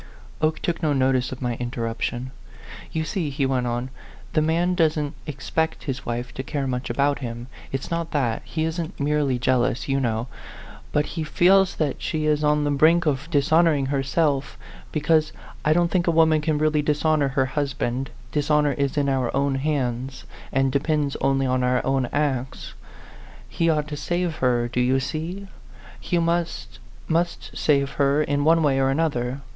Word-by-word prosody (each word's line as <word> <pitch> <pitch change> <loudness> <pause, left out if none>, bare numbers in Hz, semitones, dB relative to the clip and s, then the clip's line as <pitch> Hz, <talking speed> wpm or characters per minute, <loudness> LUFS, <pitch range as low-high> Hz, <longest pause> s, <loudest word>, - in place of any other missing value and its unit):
Oke 155 0 +2
took 175 0 -1
no 155 -3 +2
notice 130 -1 +1
of 130 0 -6
my 120 -1 -1
interruption. 120 +1 -3 0.3
" - - -14
You 160 - -1
see," 160 -1 -2
he 140 0 -1
went 130 -2 0
on, 120 +2 -3 0.2
" 125 - -21
the 155 - +3
man 170 +3 +1
doesn't 155 -4 +1
expect 155 +3 -2
his 135 -3 -5
wife 120 +1 -3
to - - -4
care 140 +1 -3
much 125 -1 -3
about 140 0 +1
him. 120 -2 -5 0.3
It's 135 +4 -4
not 170 -1 -2
that; 125 -6 0
he 160 - -3
isn't 160 +2 -3
merely 145 -2 +1
jealous, 125 +1 +1
you 135 0 +1
know. 115 -3 -1 0.7
But 150 0 +2
he 160 -1 -4
feels 190 +4 +4
that 150 -4 -2
she 155 -1 -2
is 150 0 +2
on 150 0 +3
the 145 - +1
brink 160 +5 +4
of 145 +1 -1
dishonoring 155 -1 +3
herself 140 +1 0 0.3
because 155 0 +2 0.3
I 155 - +2
don't 170 +1 +3
think 180 -2 +1
a 165 -1 +2
woman 160 -1 +5
can 150 0 0
really 155 0 +2
dishonor 150 0 +2
her 135 -1 +1
hus 140 +1 -2
band; 130 0 -2 0.2
dishonor 150 0 +2
is 140 0 -1
in 145 -1 +2
our 130 -3 +1
own 140 0 +1
hands, 135 -2 -2 0.3
and 135 0 +2
depends 145 0 0
only 135 0 +1
on 130 0 +1
our 125 0 +1
own 135 -1 +1
acts. 135 -3 -2 0.7
He 165 -1 0
ought 150 -2 +1
to 150 - -4
save 175 0 -2
her, 120 -2 +1
do 125 +1 -1
you 130 +2 +3
see? 165 +8 -4 0.5
He 175 - -1
must, 170 - -1 0.3
must 170 +1 -1
save 140 -2 +2
her 140 +2 +3
in 145 -1 0
one 165 +1 +4
way 135 -3 +2
or 135 0 +2
another. 135 -3 -1
145 Hz, 180 wpm, -24 LUFS, 130-155 Hz, 0.7 s, woman